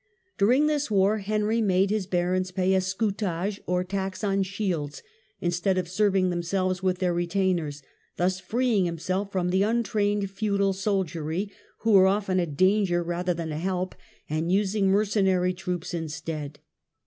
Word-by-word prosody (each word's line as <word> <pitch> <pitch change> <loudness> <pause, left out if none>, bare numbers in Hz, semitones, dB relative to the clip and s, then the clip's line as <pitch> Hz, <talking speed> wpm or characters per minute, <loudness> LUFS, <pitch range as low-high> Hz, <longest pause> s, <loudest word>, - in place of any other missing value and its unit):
During 250 +9 +4
this 300 -2 0
war 205 +1 +3
Henry 215 +2 0
made 195 -1 +2
his 210 -4 -1
barons 185 0 0
pay 185 +1 +1
a 190 - +4
scutag€y 195 0 -2
or 180 0 +1
tax 190 +1 -4
on 195 -1 +1
shields, 180 -7 -3 0.4
instead 175 +2 0
of 180 -1 -1
serving 190 -1 +2
themselves 185 +1 -1
with 185 -1 +1
their 180 -1 0
retainers, 175 -4 -1 0.3
thus 185 +1 +1
freeing 220 +1 +1
himself 185 +4 -2
from 180 -2 0
the 190 +1 +2
untrained 205 -2 +1
feudal 200 -1 +1
soldiery, 190 -2 -2 0.3
who 225 - +2
were 190 -2 +7
often 195 -1 +1
a 175 - 0
danger 185 +3 +2
rather 175 +1 -1
than 165 -1 -4
a 150 - -3
help, 185 +1 -2 0.3
and 160 +3 -1
using 200 +1 +2
mercenary 190 -2 +2
troops 180 -1 -4
instead. 155 -2 -5
190 Hz, 150 wpm, -26 LUFS, 175-200 Hz, 0.4 s, were